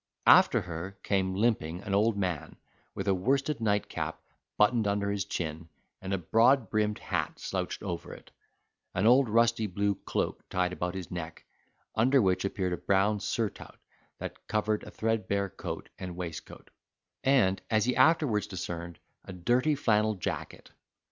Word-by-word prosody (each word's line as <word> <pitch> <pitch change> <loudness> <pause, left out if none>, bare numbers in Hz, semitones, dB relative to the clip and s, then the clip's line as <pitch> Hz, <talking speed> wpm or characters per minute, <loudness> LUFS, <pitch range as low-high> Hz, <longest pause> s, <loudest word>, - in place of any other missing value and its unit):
After - - +7
her 90 +3 -6
came, 95 -2 0
limping, 95 -5 0
an 100 - -3
old 105 +2 +3
man, 90 -6 -2 0.4
with - - -4
a 100 - +4
worsted 135 +8 0
nightcap 105 -2 -1 0.4
buttoned 110 +1 +3
under 100 0 0
his 100 -1 -1
chin, 80 -3 -4 0.3
and 95 - -5
a 95 - +1
broad 115 - +3
brimmed 105 -1 +1
hat - - -3
slouched - - -4
over - - -5
it, - - -12 0.6
an 95 - +1
old 125 +1 +5
rusty 115 0 +3
blue 100 +2 0
cloak - - -3
tied 90 0 0
about 90 0 -3
his 95 -2 -6
neck, 80 -2 -6 0.5
under 130 +5 +4
which 95 -5 +2
appeared 95 -2 -1
a - - -2
brown 100 +2 +2
surtout, 110 0 -3 0.4
that - - -8
covered 110 0 0
a - - -8
threadbare 100 -3 -1
coat 95 - -6
and 90 -2 -6
waistcoat, 85 -2 -8 0.5
and, 125 -9 +3
as 110 -1 +2
he 125 - +1
afterwards 130 -6 +3
discerned, 85 -2 -5 0.3
a 95 - -8
dirty 120 - +2
flannel 110 -5 +2
jacket. 90 - -5
100 Hz, 155 wpm, -29 LUFS, 90-115 Hz, 0.6 s, After